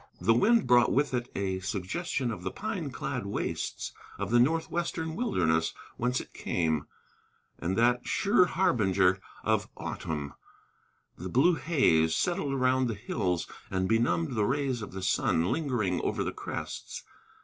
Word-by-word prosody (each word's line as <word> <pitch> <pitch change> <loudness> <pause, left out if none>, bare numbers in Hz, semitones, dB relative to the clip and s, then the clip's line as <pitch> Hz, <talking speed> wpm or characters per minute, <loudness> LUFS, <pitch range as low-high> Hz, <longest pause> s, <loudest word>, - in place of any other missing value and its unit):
The 115 - +4
wind 225 - +4
brought 120 -1 +5
with 145 0 +1
it 120 0 -1
a 95 -1 -1
suggestion 105 - -2
of 105 - -6
the - - -2
pine 195 -8 -4
clad 125 - -4
wastes - - -3 0.2
of 100 +1 -3
the 120 - +5
northwestern 160 +3 0
wilderness 80 - +1 0.2
whence 125 +2 0
it - - -10
came, 80 -4 -1 0.7
and 90 +3 -1
that 120 +1 +3
sure 200 -2 +4
harbinger 95 - +2 0.2
of 110 -1 +1
autumn, 75 -3 -4 0.9
the 90 +2 -5
blue 145 - +4
haze, 130 - +3
settled 160 -6 0
around 130 0 +2
the 115 - -2
hills, 95 -4 -1 0.2
and 95 -1 0
benumbed 95 -6 +1
the 110 -3 +1
rays 135 -3 0
of 105 - -6
the 95 0 -6
sun 90 -2 +1
lingering 120 - 0
over - - -1
the - - -3
crests. - - -6
120 Hz, 150 wpm, -29 LUFS, 95-140 Hz, 0.9 s, brought